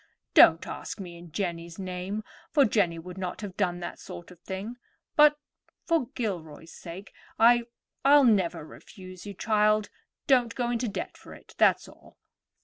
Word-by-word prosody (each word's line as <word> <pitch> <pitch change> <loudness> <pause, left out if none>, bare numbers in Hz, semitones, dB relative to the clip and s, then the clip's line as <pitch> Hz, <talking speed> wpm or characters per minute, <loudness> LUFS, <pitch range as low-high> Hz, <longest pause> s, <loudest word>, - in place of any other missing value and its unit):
Don't - - +7
ask - - -7
me 180 -3 -8
in 170 -1 -13
Jenny's 170 -2 -4
name, 185 +3 -4 0.3
for 285 -3 +4
Jenny 195 -6 +1
would 180 +3 -9
not 185 +1 -4
have 200 -3 -7
done 180 -3 -1
that - - -6
sort 175 +1 -10
of 180 - -15
thing; 195 +6 -6 0.4
but, 300 -1 +6 0.5
for 325 -8 +1
Gilroy's 165 - -5
sake, 180 +4 -10 0.2
I—I'll 240 +4 +3
never 180 -8 +2
refuse 185 +2 -12
you, 200 - -7
child. 215 0 +2 0.3
Don't 245 -4 +3
go 240 -1 -1
into 240 0 -1
debt 205 - -5
for - - -12
it, - - -17
that's - - +4
all." - - -18
195 Hz, 155 wpm, -27 LUFS, 175-235 Hz, 0.5 s, Don't